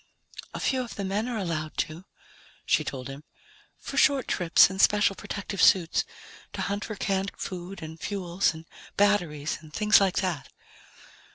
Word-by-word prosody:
"A - - -3
few 260 -1 +1
of 240 - -7
the 200 - -4
men 205 +4 -1
are 240 - -3
allowed 160 -6 -3
to," 160 +4 -3 0.6
she - - +2
told 130 -1 -5
him, 135 +2 -9 0.5
"for - - -7
short 275 -3 +4
trips 175 -1 +5
in 190 +1 -7
special 205 0 +4
protective 200 -1 -5
suits, 175 -4 +4 0.5
to - - -4
hunt 200 0 -2
for 215 - -5
canned 195 0 -1
food 185 0 -6
and 160 +1 -8
fuels 185 -1 0
and 160 0 -11 0.3
batteries 175 -8 +1
and 155 -2 -14
things 210 +5 +4
like 195 -1 +2
that." 175 -7 -3
190 Hz, 165 wpm, -27 LUFS, 160-205 Hz, 0.6 s, trips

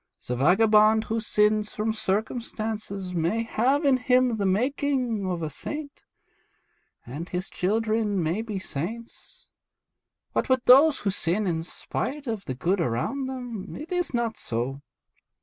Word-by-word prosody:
The 125 - -2
vagabond 215 - +5
who 225 +1 -2
sins 210 -1 +1
from 220 +1 0
circumstances 215 -2 -3
may 175 +7 0
have 260 +6 +1
in 270 -2 +5
him 250 -2 +2
the 200 -2 0
making 250 0 0
of 175 -2 -2
a 155 - -2
saint, 295 - -6 1.0
and 145 +8 -7
his 180 +1 -4
children 215 -1 0
may 170 +7 0
be 220 -3 -4
saints; 225 - -7 0.8
but - - 0
with 260 -1 +2
those 280 +4 +7
who 200 - 0
sin 185 +3 0
in 165 -3 0
spite 275 - -4
of 220 -5 -4
the 130 - -4
good 175 +8 0
around 170 - -1
them 245 -6 -6
it 310 +4 -8
is 355 -1 0
not 235 -3 -1
so. 125 +4 -3
215 Hz, 145 wpm, -26 LUFS, 185-250 Hz, 1.0 s, those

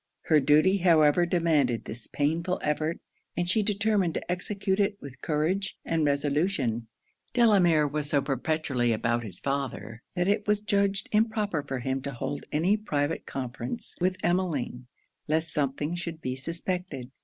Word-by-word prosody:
Her 155 -2 +4
duty 150 +8 +4
however 170 -2 +4
demanded 155 -9 +2
this 110 +1 -5
painful 165 +5 0
effort; 155 +2 -1 0.4
and 175 0 0
she 200 +5 +3
determined 205 -4 +1
to - - -3
execute 190 +2 -1
it 200 0 +1
with 135 -2 -11
courage 165 +5 -1
and 165 -1 +1
resolution. 140 - 0 0.5
Delamere 185 -10 +5
was 145 0 -2
so 145 - +3
perpetually 135 -3 0
about 120 +2 0
his 95 -5 -5
father, 125 -5 -3
that 180 0 +1
it 205 +1 +1
was 210 0 +3
judged 200 -2 0
improper 210 -6 +1
for 135 -2 -4
him 130 +2 -1
to 140 +1 -5
hold 140 +4 -4
any 175 +8 +2
private 150 -7 -2
conference 130 - -4
with 185 +1 +1
Emmeline, 160 -9 -1 0.4
lest 160 +1 0
something 145 +2 -1
should 170 -2 -4
be 130 -4 -3
suspected. 165 -2 -4
160 Hz, 150 wpm, -28 LUFS, 140-185 Hz, 0.5 s, Delamere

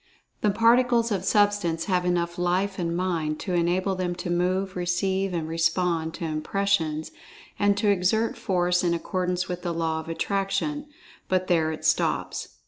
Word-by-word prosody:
The 210 - +3
Particles 235 +2 +3
of 190 -3 -1
Substance 205 -5 +2
have 180 -3 0
enough 175 -1 0
Life 185 +3 0
and 170 -1 -1
Mind 165 -4 -1
to 185 - -3
enable 180 +3 +1
them 180 -1 -2
to 175 0 -4
move, 185 +2 0
receive 190 +2 0
and 165 -3 -2
respond 165 0 0
to 170 - -5
impressions, 160 0 -1 0.5
and 205 -1 +3
to 210 0 +1
exert 220 +6 +1
force 180 -6 +1
in 170 -1 +2
accordance 180 +1 -2
with 180 -1 -4
the 175 -2 -3
Law 160 -1 -1
of 160 - -8
Attraction—but 195 - -2
there 165 -3 +2
it 155 - -7
stops. - - 0
180 Hz, 155 wpm, -25 LUFS, 170-195 Hz, 0.5 s, The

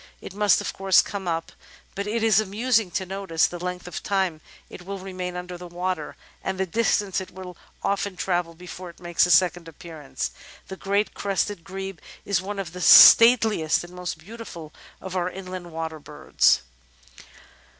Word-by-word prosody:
It - - -10
must, 205 -2 +3
of - - -4
course, 195 -1 +4
come 195 -3 -6
up, 165 -1 -2 0.4
but 200 +1 -4
it 220 +1 -1
is 220 -3 +5
amusing 215 +1 +1
to 185 +2 -3
notice 185 -3 0
the 175 - -4
length 180 0 -5
of 180 - -6
time 190 -6 -1 0.3
it 180 - -11
will 195 +2 -6
remain 185 -1 -6
under 180 0 -7
the 180 - -9
water, 175 -2 -4 0.3
and 190 0 -3
the 190 - +1
distance 205 0 0
it 190 - -9
will 180 -1 -10 0.3
often 200 -1 -1
travel 175 -2 -2
before 180 +1 -9
it 170 - -16
makes 175 0 +1
a - - -5
second 175 0 +3
appearance. 160 -2 -6 0.4
The 190 - -6
Great 200 +2 -1
Crested 200 -2 -2
Grebe 195 -1 -7 0.3
is 200 -3 +1
one 200 +2 -6
of 185 -4 -5
the 180 - -7
stateliest 220 -9 +7
and 175 +1 -12
most 180 -3 -5
beautiful 170 -4 -10 0.3
of 190 0 -7
our 180 -1 0
inland 185 -2 -8
water 160 -1 -5
birds. 145 - +1
185 Hz, 175 wpm, -24 LUFS, 175-195 Hz, 0.4 s, stateliest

